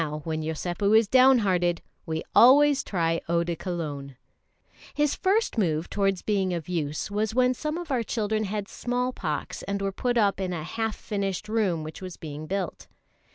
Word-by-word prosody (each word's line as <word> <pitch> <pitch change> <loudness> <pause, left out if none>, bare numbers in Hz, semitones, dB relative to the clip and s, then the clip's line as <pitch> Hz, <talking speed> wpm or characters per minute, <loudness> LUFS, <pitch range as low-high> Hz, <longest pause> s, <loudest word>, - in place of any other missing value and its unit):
Now, 150 -1 -4
when 160 0 -2
Yosépu 175 +6 +1
is 225 -1 +3
down 260 +3 +6
hearted, 175 -2 +1 0.2
we 160 0 -2
always 285 +3 +6
try 165 -3 0
eau 170 0 +2
de 170 0 -2
Cologne. 150 -6 -5 0.8
His 295 -1 +2
first 395 - +1
move 160 -4 0
towards 195 -2 0
being 190 -4 0
of 165 -3 -5
use 155 0 -3
was 215 +2 -1
when 250 0 +4
some 305 +5 -3
of 345 -4 -6
our 255 -3 +1
children 215 -1 -1
had 205 0 -3
small 250 +1 -2
pox 155 -9 -4
and 200 +1 -3
were 195 0 -1
put 245 +5 -1
up 200 -4 +2
in 185 -2 -2
a 160 -3 -4
half 225 +5 -2
finished 200 -2 -3
room 205 -7 0
which 155 +3 -8
was 185 -2 -7
being 155 0 -7
built. 190 -2 -3
195 Hz, 185 wpm, -26 LUFS, 165-225 Hz, 0.8 s, down